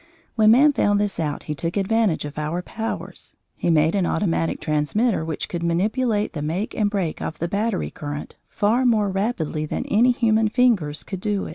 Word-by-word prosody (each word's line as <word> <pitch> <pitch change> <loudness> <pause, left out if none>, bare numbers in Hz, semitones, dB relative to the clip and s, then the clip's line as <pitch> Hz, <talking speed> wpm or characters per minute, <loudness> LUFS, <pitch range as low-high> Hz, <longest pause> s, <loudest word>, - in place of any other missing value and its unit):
When 215 -2 +4
man 280 +6 +6
found 205 -5 +2
this 205 -1 -1
out 150 -3 -2
he 150 - -4
took 165 +5 -3
advantage 200 -4 +1
of 145 +1 -6
our 160 +4 -2
powers. 225 +3 -6 0.2
He - - -2
made 160 0 +3
an 190 -4 +1
automatic 165 -4 0
transmitter 160 +8 0
which 160 -2 -3
could 175 - -4
manipulate 210 +6 0
the 150 - -4
make 170 +9 -2
and 210 -2 +1
break 190 -6 -2
of 160 - -4
the 170 - -2
battery 205 +2 -1
current 145 0 -6
far 225 +5 +1
more 215 -5 +2
rapidly 185 -7 -2
than - - -3
any 235 +4 +3
human 225 -3 +2
fingers 210 - +1
could 190 -3 -6
do. 205 -1 -1
200 Hz, 185 wpm, -23 LUFS, 160-220 Hz, 0.2 s, man